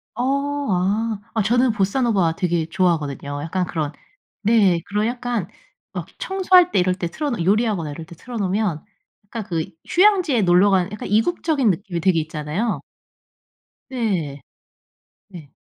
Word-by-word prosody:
어. 240 Hz, -, -1 dB
아. 230 Hz, -7 st, 0 dB
아 220 Hz, -, +1 dB
저는 245 Hz, +4 st, +3 dB
보사노바 200 Hz, -4 st, +1 dB
되게 170 Hz, -3 st, 0 dB
좋아하거든요. 150 Hz, -5 st, -1 dB
약간 180 Hz, +3 st, -1 dB
그런 155 Hz, -4 st, -3 dB, 0.5 s
네 200 Hz, -6 st, +3 dB
그런 210 Hz, +2 st, 0 dB
약간 240 Hz, -5 st, -2 dB, 0.5 s
어 -, -, -3 dB, 0.2 s
청소할 375 Hz, -5 st, +4 dB
때 -, -, +2 dB
이럴 180 Hz, 0 st, +2 dB
때 180 Hz, -2 st, -3 dB
틀어 290 Hz, -, -3 dB
요리하거나 200 Hz, -5 st, +1 dB
이럴 160 Hz, +2 st, -8 dB
때 170 Hz, -, -13 dB
틀어 240 Hz, +8 st, -8 dB
놓으면 195 Hz, -5 st, -1 dB, 0.4 s
약간 220 Hz, +2 st, -6 dB
그 165 Hz, -4 st, -2 dB, 0.2 s
휴양지에 360 Hz, -, +4 dB
놀러 185 Hz, +2 st, +5 dB
가는 190 Hz, -1 st, +2 dB
약간 210 Hz, -, -6 dB
이국적인 275 Hz, -, +2 dB
느낌이 185 Hz, -2 st, -2 dB
되게 180 Hz, -1 st, +3 dB
있잖아요. 155 Hz, +4 st, -3 dB, 1.1 s
네. 185 Hz, -, -2 dB, 0.9 s
네. 170 Hz, -7 st, -12 dB
200 Hz, 295 characters per minute, -21 LUFS, 170-240 Hz, 1.1 s, 놀러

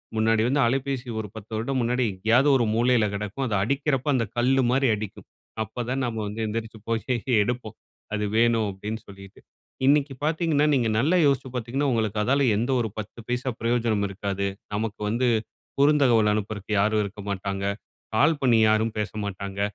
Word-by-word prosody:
முன்னாடி 110 Hz, 0 st, +2 dB
வந்து 140 Hz, +3 st, +2 dB
அலைபேசி 135 Hz, 0 st, -1 dB
ஒரு 110 Hz, -, -4 dB
10 110 Hz, 0 st, -10 dB
வருடம் 130 Hz, +4 st, -1 dB
முன்னாடி 125 Hz, +2 st, +1 dB
எங்கேயாவது 115 Hz, +9 st, +3 dB
ஒரு 120 Hz, -, +1 dB
மூலையில 120 Hz, 0 st, +3 dB
கெடக்கும். 105 Hz, +6 st, -3 dB
அது 105 Hz, -, -1 dB
அடிக்கிறப்போ 140 Hz, +3 st, 0 dB
அந்த 115 Hz, -3 st, +1 dB
கல்லு 130 Hz, +2 st, +3 dB
மாரி 135 Hz, +1 st, +3 dB
அடிக்கும். 105 Hz, -1 st, -8 dB, 0.4 s
அப்ப 110 Hz, +3 st, -5 dB
தான் 130 Hz, +1 st, -1 dB
நம்ம 115 Hz, -2 st, -3 dB
வந்து 105 Hz, +2 st, -5 dB
எந்தரிச்சு 110 Hz, 0 st, -5 dB
போய் 115 Hz, -1 st, 0 dB, 0.4 s
எடுப்போம். 120 Hz, -2 st, -4 dB, 0.4 s
அது 105 Hz, 0 st, -1 dB
வேணும் 115 Hz, -2 st, +3 dB
அப்டின்னு 105 Hz, +4 st, -6 dB
சொல்லிட்டு. 100 Hz, -1 st, -13 dB, 0.5 s
இன்னிக்கு 145 Hz, 0 st, +3 dB
பார்த்தீங்கன்னா, 160 Hz, -2 st, +2 dB
நீங்க 120 Hz, -3 st, +1 dB
நல்லா 160 Hz, +9 st, +3 dB
யோசிச்சு 135 Hz, -1 st, 0 dB
பார்த்தீங்கன்னா, 125 Hz, +4 st, -1 dB
உங்களுக்கு 110 Hz, -2 st, 0 dB
அதனால 135 Hz, +5 st, +2 dB
எந்த 120 Hz, +5 st, 0 dB
ஒரு 110 Hz, -, -2 dB
10 105 Hz, +2 st, -8 dB
பைசா 125 Hz, +1 st, -1 dB
பிரயோஜனமும் 115 Hz, -3 st, +1 dB
இருக்காது. 100 Hz, 0 st, -3 dB, 0.3 s
நமக்கு 110 Hz, 0 st, -3 dB
வந்து 120 Hz, +3 st, +1 dB, 0.5 s
குறுந்தகவல் 135 Hz, -7 st, +4 dB
அனுப்புறக்கு 105 Hz, -1 st, -4 dB
யாரும் 105 Hz, +1 st, +2 dB
இருக்க 100 Hz, +1 st, -7 dB
மாட்டாங்க. 100 Hz, 0 st, -3 dB, 0.5 s
கால் 145 Hz, +6 st, +3 dB
பண்ணி 120 Hz, -4 st, +4 dB
யாரும் 110 Hz, +1 st, +1 dB
பேசமாட்டாங்க. 100 Hz, -2 st, -4 dB
115 Hz, 160 wpm, -25 LUFS, 105-130 Hz, 0.5 s, குறுந்தகவல்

